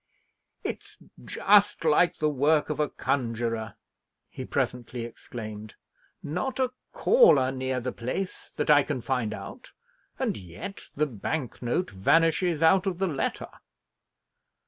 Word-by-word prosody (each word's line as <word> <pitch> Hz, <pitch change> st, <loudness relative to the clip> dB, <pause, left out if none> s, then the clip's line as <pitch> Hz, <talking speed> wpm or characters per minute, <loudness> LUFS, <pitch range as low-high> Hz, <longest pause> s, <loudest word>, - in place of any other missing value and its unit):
"It's -, -, -5 dB, 0.3 s
just 205 Hz, -3 st, +3 dB
like 165 Hz, +3 st, +4 dB
the 155 Hz, -, +1 dB
work 150 Hz, +2 st, +2 dB
of 150 Hz, -, -4 dB
a 150 Hz, -, +1 dB
conjuror!" 115 Hz, -3 st, -2 dB, 0.6 s
he -, -, -6 dB
presently 120 Hz, -1 st, -2 dB
exclaimed. 110 Hz, -2 st, -8 dB, 0.5 s
"Not 180 Hz, -, -3 dB
a 255 Hz, -1 st, +1 dB, 0.2 s
caller 465 Hz, -, +5 dB
near 130 Hz, -1 st, -2 dB
the 125 Hz, +1 st, -3 dB
place, 130 Hz, +13 st, -4 dB
that -, -, +2 dB
I 145 Hz, -1 st, +7 dB
can 140 Hz, -3 st, -3 dB
find 125 Hz, -4 st, -1 dB
out, -, -, -9 dB, 0.4 s
and -, -, -1 dB
yet 100 Hz, -, -8 dB
the 150 Hz, -, +2 dB
bank 130 Hz, +1 st, -4 dB
note 120 Hz, +6 st, -1 dB
vanishes 165 Hz, -, +2 dB
out 185 Hz, +4 st, +5 dB
of 185 Hz, -3 st, -1 dB
the 190 Hz, -, 0 dB
letter! 150 Hz, -7 st, -2 dB
145 Hz, 130 wpm, -27 LUFS, 120-170 Hz, 0.6 s, I